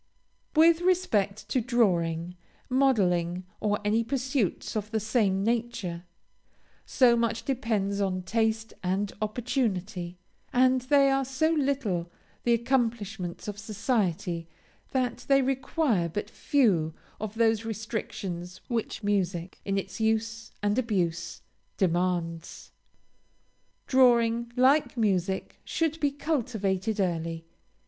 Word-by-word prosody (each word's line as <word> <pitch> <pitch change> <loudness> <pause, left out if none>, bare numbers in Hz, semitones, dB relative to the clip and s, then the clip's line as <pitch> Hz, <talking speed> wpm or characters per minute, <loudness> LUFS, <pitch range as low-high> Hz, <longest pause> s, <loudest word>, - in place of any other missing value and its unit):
With 325 +2 +6
respect 285 - +1
to 255 - +1
drawing, 180 -8 +1 0.3
modeling, 185 -10 +2
or 210 -1 +1
any 220 +2 +2
pursuits 255 - -1
of 210 -1 -2
the 220 0 0
same 205 -3 +1
nature, 220 -7 -2 0.8
so 245 -3 +5
much 230 -1 -1
depends 215 -6 0
on 185 -2 -1
taste 220 +2 0
and 190 +2 -1
opportunity, 210 -6 -2 0.3
and 255 +1 +4
they 275 +2 +4
are 270 0 +2
so 270 +5 +1
little 265 - 0 0.3
the 240 - +2
accomplishments 225 -7 -1
of 205 -1 -5
society 195 -6 -1 0.4
that 250 -3 -1
they 275 -1 +5
require 260 - 0
but 205 +6 -4
few 180 - +2 0.2
of 215 0 -5
those 225 -1 +2
restrictions 200 -5 -5
which 230 -2 -2
music, 185 -3 -1
in 195 0 0
its 195 +2 -4
use 220 0 0
and 205 +4 +2
abuse, 175 -8 -1 0.3
demands. 175 -2 -1 1.1
Drawing, 235 -2 +4
like 265 +2 +3
music, 190 -4 0
should 325 -1 -1
be 290 - +2
cultivated 225 - -1
early. 165 -3 -1
220 Hz, 110 wpm, -28 LUFS, 185-250 Hz, 1.1 s, With